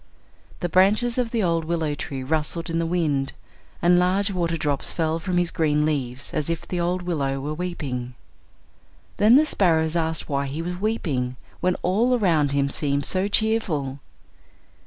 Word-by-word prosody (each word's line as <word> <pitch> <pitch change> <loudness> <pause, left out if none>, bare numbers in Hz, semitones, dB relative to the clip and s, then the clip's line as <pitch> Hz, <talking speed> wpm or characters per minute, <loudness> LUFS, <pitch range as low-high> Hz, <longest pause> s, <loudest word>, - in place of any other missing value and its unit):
The 175 - 0
branches 210 +8 +3
of 245 -2 0
the 230 -2 0
old 165 -2 +1
willow 160 -2 -1
tree 135 -2 -5
rustled 160 +4 -1
in 165 - 0
the 165 - 0
wind, 150 -6 0 0.5
and 175 +1 +5
large 190 +3 +2
water 170 -3 -1
drops 145 -3 0
fell 160 -1 -1
from 180 +2 -2
his 175 -1 +1
green 150 -2 +1
leaves 135 -4 -2
as 155 0 -1
if 165 -1 -3
the 180 - -3
old 175 +1 -1
willow 140 -6 -1
were 145 +3 -3
weeping. 140 -8 -4 1.0
Then 215 +4 +6
the 300 +3 +6
sparrows 165 - +2
asked 160 -1 -1
why 140 -1 -1
he 150 +5 -4
was 180 +1 -4
weeping, 145 - -1 0.2
when 180 0 +1
all 230 +8 +2
around 165 -9 +2
him 140 0 +1
seemed 140 -1 0
so 190 +1 0
cheerful. 195 -11 0
165 Hz, 170 wpm, -24 LUFS, 145-185 Hz, 1.0 s, Then